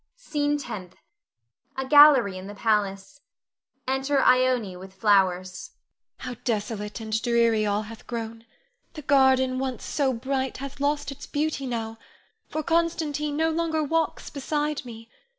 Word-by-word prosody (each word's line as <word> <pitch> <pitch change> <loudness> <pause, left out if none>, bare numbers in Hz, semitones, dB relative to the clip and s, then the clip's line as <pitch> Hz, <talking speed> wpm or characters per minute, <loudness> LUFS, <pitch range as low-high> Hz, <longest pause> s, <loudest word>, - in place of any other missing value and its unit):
SCENE 295 -11 -1
TENTH. 205 -10 -7 0.8
[A 265 - -2
gallery 280 -8 +7
in 185 +1 -8
the 205 - -8
palace. 210 +5 -1 0.7
Enter 270 +2 +1
Ione 255 -7 +3
with 190 +1 -11
flowers.] 185 -3 +1 0.5
Ione. 250 -2 -5
How - - -33
desolate 210 -2 -3
and 220 0 -2
dreary 230 -3 +2
all 205 +1 0
hath 220 +1 -12
grown! 230 -1 -5 0.5
The 305 -3 -9
garden 265 -2 +3
once 260 -3 -4
so 275 -3 0
bright 260 +2 -2
hath 275 +1 -8
lost 290 0 0
its 275 - -10
beauty 295 -2 -2
now, 225 -2 -4 0.5
for 310 - -3
Constantine 310 -3 0
no 320 +1 +2
longer 320 -1 0
walks 320 +1 -1
beside 295 +1 -2
me. 230 -1 -10
255 Hz, 140 wpm, -25 LUFS, 220-290 Hz, 0.8 s, gallery